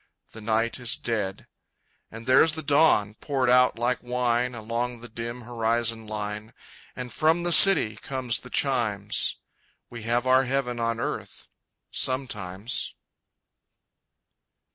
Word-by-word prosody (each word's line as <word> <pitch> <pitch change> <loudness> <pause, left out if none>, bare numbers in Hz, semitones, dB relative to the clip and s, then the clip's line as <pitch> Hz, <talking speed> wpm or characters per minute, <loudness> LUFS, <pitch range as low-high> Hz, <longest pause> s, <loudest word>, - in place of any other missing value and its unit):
The 110 - -11
night 115 +3 -1
is 120 -2 0
dead. 105 -5 -4 0.6
And 115 +1 -11
there's 130 +5 +4
the 160 0 -5
dawn, 140 -8 +3
poured 130 -3 0
out 125 -1 +4
like 120 +2 -1
wine 125 0 -1
Along 115 +2 -4
the 120 - -9
dim 120 +2 -7
horizon 115 -1 -1
line. 105 0 -6 0.4
And 125 -2 -7
from 160 +4 +1
the 175 - 0
city 165 - +7
comes 125 -2 -2
the 125 - -13
chimes 110 -7 0 0.5
We 120 -1 -8
have 120 +2 -1
our 130 +1 +4
heaven 125 -2 -2
on 115 0 -1
earth - - -6 0.4
sometimes! 115 -2 -2
120 Hz, 125 wpm, -25 LUFS, 110-130 Hz, 0.6 s, city